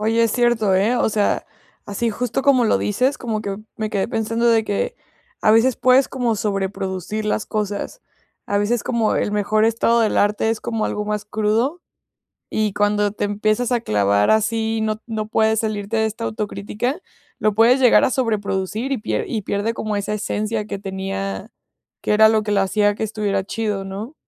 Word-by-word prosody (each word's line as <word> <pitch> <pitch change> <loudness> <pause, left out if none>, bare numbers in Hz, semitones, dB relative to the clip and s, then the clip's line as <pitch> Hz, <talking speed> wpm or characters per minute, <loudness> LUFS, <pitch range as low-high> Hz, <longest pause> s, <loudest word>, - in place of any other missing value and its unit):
Oye, 225 +2 +2
es 230 - +2
cierto, 225 -5 +2
¿eh? 210 +6 +2
O 245 - +2
sea, 210 -1 0 0.4
así 215 +3 -2
justo 245 +4 -2
como 260 -4 +4
lo - - +3
dices, 255 +8 0
como 220 -3 -3
que, 195 -1 -4 0.2
me 215 -1 -3
quedé 195 -2 0
pensando 230 +1 -1
de 225 -1 +4
que, 205 - -2 0.5
a - - +5
veces 225 +3 +4
puedes 255 +1 +4
como 240 -4 -1
sobreproducir 195 0 -3
las 210 0 -1
cosas. 210 - -3 0.5
A 205 - 0
veces, 215 +3 0
como 230 -3 +1
el 205 - -1
mejor 210 +1 +2
estado 230 +1 +2
del 220 - +1
arte 210 +2 +2
es 225 - -2
como 225 -2 -2
algo 210 - -2
más 210 0 -3
crudo, 220 +10 0 0.7
y 215 -2 0
cuando 205 0 +1
te 210 - -4
empiezas 215 +4 0
a 240 - +2
clavar 100 - +2
así 220 +1 +1
no 215 0 -2
no 215 -2 -4
puedes 220 0 +2
salirte 215 0 -3
de 220 - +2
esta 220 +1 -4
autocrítica, 215 - -3 0.4
lo 215 -1 +2
puedes 240 +4 +5
llegar 250 -2 +5
a - - +3
sobreproducir 215 0 -1
y 270 - +1
pier 210 - -2
y 215 -4 -2
pierde 205 +4 -1
como 215 -2 -3
esa 205 +1 -2
esencia 215 +1 -2
que 200 - -5
tenía, 195 +1 -5 0.5
que - - -1
era 220 +1 +7
lo 220 -1 +2
que 210 - -3
lo 200 - +3
hacía 205 +1 +2
que 220 - -3
estuviera 205 -3 -1
chido, 205 -2 -2
¿no? 210 +9 -7
215 Hz, 190 wpm, -21 LUFS, 205-230 Hz, 0.7 s, era